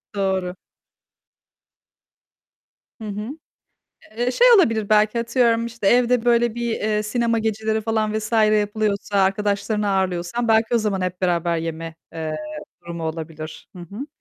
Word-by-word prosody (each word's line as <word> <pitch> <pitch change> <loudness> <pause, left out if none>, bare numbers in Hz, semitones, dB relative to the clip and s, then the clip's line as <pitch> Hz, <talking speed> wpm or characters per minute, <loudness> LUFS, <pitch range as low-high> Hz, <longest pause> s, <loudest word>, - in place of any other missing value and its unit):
Doğru. 190 -2 -1 2.5
Hı 215 - -6
hı. 210 +3 -5 0.9
Eee, 240 +2 0
şey 485 - +4
olabilir, 225 - +2
belki 215 +2 +3
atıyorum, 230 -1 +2
işte, 235 -3 -5
evde, 245 +1 +3
böyle, 235 -1 +3
bir, 235 -1 -2
eee, 210 0 0
sinema 230 +1 0
geceleri 220 0 -1
falan 215 -1 -1
vs. 215 +2 -6
yapılıyorsa, 210 -2 +2
arkadaşlarını 205 +2 0
ağırlıyorsan 190 +4 -1
belki 225 +2 +3
o - - +5
zaman 210 -3 -1
hep 185 0 -3
beraber 170 -2 +1
yeme, 165 0 -5 0.2
eee, 160 -1 -4 0.5
durumu 170 -1 -6
olabilir. 160 -1 -6
Hı 175 - -8
hı. 205 - -7
210 Hz, 130 wpm, -22 LUFS, 185-230 Hz, 2.5 s, o